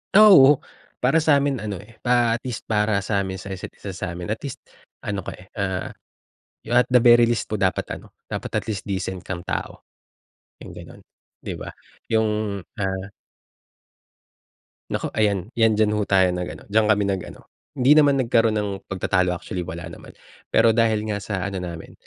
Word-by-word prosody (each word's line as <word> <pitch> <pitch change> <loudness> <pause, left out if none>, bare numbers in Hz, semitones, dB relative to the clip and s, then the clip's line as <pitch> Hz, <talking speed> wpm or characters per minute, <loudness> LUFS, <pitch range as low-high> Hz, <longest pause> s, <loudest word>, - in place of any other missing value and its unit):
Ah, 215 +1 +9
oo. 140 -2 +8 0.4
Para 135 +6 +3
sa'min 140 -5 +2
ano, 105 -2 -4
eh, 105 +2 -15
pa 120 -2 +3
at 115 - -6
least 125 -4 -5
para 105 -1 +1
sa'min 100 -2 -2
sa 95 +1 -7
isa't 95 - -8
isa 100 - -7
sa'min 90 -1 -5
at 110 - -9
least 140 -3 -5 0.5
ano 100 -1 -2
ko, - - -6
eh, 90 - -13
ah, 95 -3 -3 0.7
you 120 - -2
at 125 - +6
the 125 - +7
very 120 0 +7
least 120 - -1
po - - -3
dapat 95 -3 0
ano, - - -15 0.2
dapat - - -5
at - - -14
least 105 -3 -3
decent 95 -2 -4
kang 90 -2 -5
tao, - - -4 0.8
yung - - -9
gano'n, - - -12 0.4
di - - -5
ba? - - -7 0.4
Yung, 105 -2 0 0.2
ah 95 -1 -3 1.8
Naku, - - -2
ayan. 105 0 0
'Yan 110 -2 +3
diyan 105 -1 +3
ho 105 - 0
tayo 95 -2 +4
nag-ano, 90 0 -6
diyan 110 +2 +2
kami 105 -1 +3
nag-ano, 95 -2 -4 0.3
hindi 130 +3 +6
naman 145 -2 +5
nagkaroon 115 -3 +2
ng 105 -1 -1 0.2
pagtatalo 90 -1 +1
actually 90 0 -5
wala 85 -1 -6
naman. 85 - -11 0.4
Pero 115 - +4
dahil 110 -2 +2
nga 105 -1 -3
sa 95 -3 -3
ano 100 -2 -4
namin, 85 -2 -7
105 Hz, 175 wpm, -23 LUFS, 95-115 Hz, 1.8 s, Ah